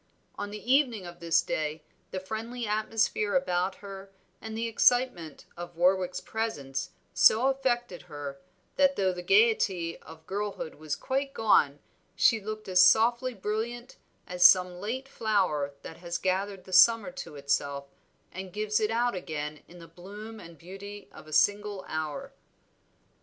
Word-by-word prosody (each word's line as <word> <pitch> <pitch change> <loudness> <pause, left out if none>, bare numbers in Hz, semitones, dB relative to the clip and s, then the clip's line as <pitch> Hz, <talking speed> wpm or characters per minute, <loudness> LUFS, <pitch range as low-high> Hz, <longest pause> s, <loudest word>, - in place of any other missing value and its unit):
On 205 - -5
the 210 +5 -1
evening 245 -9 +2
of 175 0 -10
this 165 -1 +2
day 155 0 -3 0.3
the 190 - -4
friendly 225 +5 -5
atmosphere 215 0 0
about 185 -7 0
her, 195 0 -9 0.3
and 220 0 -6
the 230 +1 -1
excitement 230 - +1
of 175 0 -8
Warwick's 180 +1 +2
presence 145 -12 -3 0.2
so 245 +5 +5
affected 240 - -1
her, 140 -2 -7 0.4
that 280 -1 +4
though 190 -4 +1
the 180 - -6
gayety 195 -3 +2
of 160 0 -15
girlhood 200 -3 -4
was 155 0 -4
quite 275 - -3
gone 150 -10 +3 0.4
she 225 +3 +4
looked 215 +1 -6
as 185 -1 +5
softly 235 +6 +4
brilliant 225 +4 -4 0.3
as 180 0 -1
some 180 0 +6
late 260 +6 -4
flower 185 - 0
that 160 - -9
has 170 0 -4
gathered 190 +1 -2
the 185 - -11
summer 230 +7 +6
to 265 - -8
itself 140 0 -1 0.5
and 185 0 -7
gives 215 +1 0
it 215 - +1
out 240 +2 +1
again 150 -4 -5
in 175 - -14
the 165 -1 -12
bloom 205 +6 -10
and 170 -4 -12
beauty 195 +5 -10
of - - -14
a - - -12
single 205 0 +1
hour. 160 - -4
195 Hz, 150 wpm, -28 LUFS, 175-225 Hz, 0.5 s, some